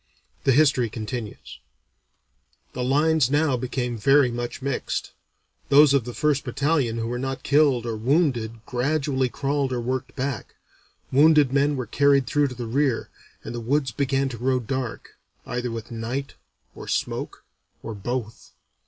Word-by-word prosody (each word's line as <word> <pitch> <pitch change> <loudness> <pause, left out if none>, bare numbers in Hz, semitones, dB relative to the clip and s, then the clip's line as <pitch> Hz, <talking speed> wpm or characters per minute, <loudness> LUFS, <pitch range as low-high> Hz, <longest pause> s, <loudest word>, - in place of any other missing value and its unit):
The 135 - +5
history 130 -4 +3
continues: 110 0 -6 1.1
"The 125 - -3
lines 145 +1 +3
now 145 -1 +2
became 125 -1 -3
very 135 +3 +4
much 120 0 -4
mixed. 140 -2 -2 0.6
Those 145 0 +7
of 135 -5 +2
the 120 - -6
first 150 -2 +1
battalion 135 -2 0
who 115 - -2
were 120 +1 -3
not 135 0 -4
killed 140 -5 +3
or 115 -1 -2
wounded 115 -3 0
gradually 135 0 0
crawled 140 +1 -1
or 125 - -1
worked 130 +2 -3
back; 130 -4 -4 0.6
wounded 150 -1 +5
men 145 +1 +2
were 130 -2 -3
carried 140 +3 +3
through 145 +1 +2
to 125 - -7
the 120 -1 -5
rear; 130 +1 0 0.3
and - - -6
the 120 - -4
woods 130 +3 0
began 135 +1 0
to 120 -3 -8
grow 130 +1 +1
dark, 125 0 -5 0.3
either 125 0 -3
with 115 -1 -6
night 120 +5 -4 0.4
or - - -10
smoke - - -3 0.4
or 115 - -5
both. 115 +2 -5
130 Hz, 155 wpm, -24 LUFS, 120-140 Hz, 1.1 s, Those